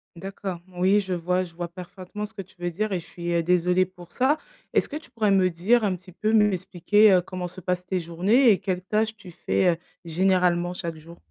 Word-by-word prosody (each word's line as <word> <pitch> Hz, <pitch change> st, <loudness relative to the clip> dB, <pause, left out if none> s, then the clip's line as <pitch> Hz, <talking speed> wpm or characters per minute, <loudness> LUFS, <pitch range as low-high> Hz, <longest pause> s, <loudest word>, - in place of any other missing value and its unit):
D'accord. 190 Hz, 0 st, -6 dB, 0.2 s
Oui, 190 Hz, +3 st, +4 dB
je 190 Hz, -2 st, -4 dB
vois 180 Hz, +2 st, 0 dB
je 170 Hz, -2 st, -11 dB
vois 175 Hz, 0 st, -4 dB
parfaitement 185 Hz, +3 st, -8 dB
ce 220 Hz, -, -17 dB
que 195 Hz, -, -5 dB
tu 185 Hz, +3 st, -24 dB
veux 175 Hz, 0 st, -2 dB
dire 210 Hz, +5 st, -2 dB
et 185 Hz, -, 0 dB
je 165 Hz, -, -12 dB
suis, 175 Hz, 0 st, -5 dB
heu, 170 Hz, -, +2 dB
désolée 180 Hz, +2 st, +2 dB
pour 175 Hz, -2 st, -15 dB
ça. 270 Hz, +4 st, +2 dB, 0.4 s
Est-ce -, -, +3 dB
que 290 Hz, -, -7 dB
tu 315 Hz, -, -8 dB
pourrais 215 Hz, -3 st, +1 dB
me 185 Hz, -2 st, +4 dB
dire 210 Hz, +8 st, +2 dB
un 190 Hz, -3 st, +1 dB
petit 185 Hz, +1 st, -13 dB
peu, 215 Hz, +5 st, -1 dB
m'expliquer, 205 Hz, 0 st, +4 dB
heu, 180 Hz, -, +5 dB
comment 180 Hz, 0 st, -5 dB
se 185 Hz, +1 st, -10 dB
passent 180 Hz, +1 st, -2 dB
tes 185 Hz, -1 st, 0 dB
journées 195 Hz, +9 st, +3 dB
et 195 Hz, -, +2 dB
quelles 185 Hz, -2 st, -2 dB
tâches 215 Hz, +2 st, 0 dB
tu 185 Hz, -4 st, -12 dB
fais, 95 Hz, -, +1 dB
heu, 165 Hz, -, -2 dB, 0.3 s
généralement 180 Hz, 0 st, +2 dB
chaque 165 Hz, -3 st, -5 dB
jour? 170 Hz, +2 st, -13 dB
185 Hz, 235 wpm, -25 LUFS, 175-205 Hz, 0.4 s, heu